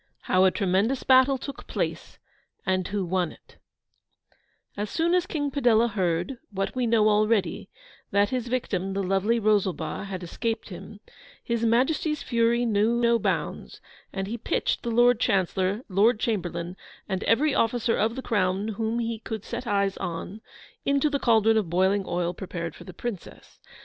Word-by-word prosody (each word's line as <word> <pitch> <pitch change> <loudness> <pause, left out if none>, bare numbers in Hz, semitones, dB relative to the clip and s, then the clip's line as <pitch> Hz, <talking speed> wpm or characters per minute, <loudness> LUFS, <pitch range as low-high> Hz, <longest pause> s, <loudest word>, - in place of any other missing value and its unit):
HOW 185 +1 +3
A - - +6
TREMENDOUS 200 +7 0
BATTLE 260 +1 +5
TOOK 275 +2 -8
PLACE, - - -3 0.5
AND 185 -1 0
WHO 200 -2 -2
WON 180 -1 -1
IT - - -22 1.2
As 205 0 -3
soon 335 - +1
as 360 0 +2
King 290 -5 -2
Padella 240 -4 +3
heard, 180 +4 -1
what 195 -1 -3
we 250 -2 0
know 225 -2 +4
already, 210 -3 +1 0.4
that 200 +1 +2
his 250 -2 -2
victim, 195 -6 -2
the 195 0 -1
lovely 195 +5 +1
Rosalba, 205 -3 0
had 190 -2 -6
escaped 225 +7 -3
him, 205 +2 -10 0.4
His 235 -1 -1
Majesty's 280 +6 +1
fury 235 0 +2
knew 220 +1 +2
no 235 -1 +3
bounds, - - -3 0.3
and 195 0 -3
he 230 +4 -5
pitched - - -1
the 235 - -3
Lord 240 0 +4
Chancellor, 190 0 +1
Lord 210 +4 +3
Chamberlain, 175 -5 -2 0.3
and 190 0 -2
every 285 +6 +3
officer 230 -1 +1
of 225 +2 0
the 265 - -5
Crown 200 -1 0
whom 220 +2 -2
he 230 -1 -2
could 220 -2 -6
set 240 +1 -5
eyes 200 -2 +1
on, 175 +5 -5 0.4
into 280 +1 +2
the 280 - 0
cauldron 225 -2 +4
of 205 -6 0
boiling 190 +3 +2
oil 175 0 -1
prepared 170 -2 -5
for - - -13
the 185 - -8
Princess. 230 -5 -7
215 Hz, 165 wpm, -26 LUFS, 190-235 Hz, 1.2 s, A